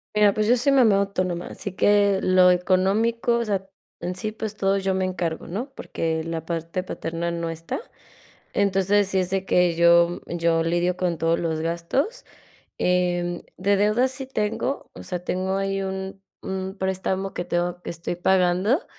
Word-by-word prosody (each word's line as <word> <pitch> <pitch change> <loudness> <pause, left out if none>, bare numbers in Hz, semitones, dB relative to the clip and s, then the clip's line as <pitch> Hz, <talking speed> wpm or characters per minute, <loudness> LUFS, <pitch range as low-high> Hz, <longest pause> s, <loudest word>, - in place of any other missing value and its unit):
Mira, 205 -1 +5
pues, 215 0 0
yo 245 +3 +4
soy 275 +3 +3
mamá 230 -7 +5
autónoma, 185 -3 -1
así 200 - -6
que 200 0 +3
lo 185 0 +5
económico, 200 +6 +2
o 235 - -1
sea, 195 -2 -1 0.4
en 180 - -2
sí, 215 +2 -4
pues, 215 -1 -5
todo 195 0 +2
yo 190 0 0
me 185 0 0
encargo, 175 -3 -3
¿no?, 240 +10 -4
porque 160 -8 -2
la 165 -1 -4
parte 170 +2 -3
paterna 170 -1 -3
no 170 -1 -3
está. 165 0 -5 0.7
Entonces, 200 0 +2
si 190 - +1
es 185 0 -1
de 190 0 -1
que 180 -2 +3
yo 170 0 +5
yo 165 -1 +1
lidio 175 +2 0
con 175 -3 -1
todos 165 +1 +1
los 160 -2 -1
gastos. 170 - -2 0.5
Em, 175 -1 0 0.2
de 200 +2 +2
deudas 220 +6 +2
sí 265 0 -6
tengo, 225 +3 -2
o - - -9
sea, 180 -1 -4
tengo 190 +1 -1
ahí 195 0 -1
un 190 0 -5 0.2
un 190 +1 -4
préstamo 190 0 -2
que 175 - -3
tengo, 175 0 -2
que - - -5
estoy 170 +1 -4
pagando 190 - +2
185 Hz, 175 wpm, -24 LUFS, 175-200 Hz, 0.7 s, Mira